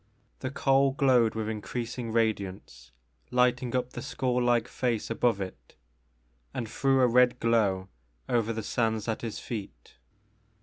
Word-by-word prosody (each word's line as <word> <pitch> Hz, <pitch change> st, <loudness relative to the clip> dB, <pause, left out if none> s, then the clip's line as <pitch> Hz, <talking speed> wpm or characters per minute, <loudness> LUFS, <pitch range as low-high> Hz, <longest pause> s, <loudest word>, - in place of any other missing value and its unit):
The 130 Hz, -, -3 dB
coal 135 Hz, 0 st, +3 dB
glowed 125 Hz, -5 st, +3 dB
with 110 Hz, -1 st, -2 dB
increasing 115 Hz, +3 st, -4 dB
radiance, 110 Hz, -4 st, -2 dB, 0.4 s
lighting 125 Hz, 0 st, +2 dB
up 125 Hz, 0 st, -1 dB
the -, -, -6 dB
skull 125 Hz, -2 st, -1 dB
like 120 Hz, -1 st, +2 dB
face 120 Hz, -3 st, -2 dB
above 115 Hz, -2 st, +1 dB
it, 95 Hz, -1 st, -8 dB, 0.8 s
and 115 Hz, -, -3 dB
threw 135 Hz, +3 st, +2 dB
a 125 Hz, -, +6 dB
red 125 Hz, +1 st, +4 dB
glow 100 Hz, -5 st, +2 dB, 0.4 s
over 115 Hz, -2 st, +1 dB
the 110 Hz, -1 st, -4 dB
sands 110 Hz, -1 st, -1 dB
at 110 Hz, -, -2 dB
his 115 Hz, -3 st, -4 dB
feet. 100 Hz, -, -8 dB
115 Hz, 140 wpm, -28 LUFS, 110-125 Hz, 0.8 s, a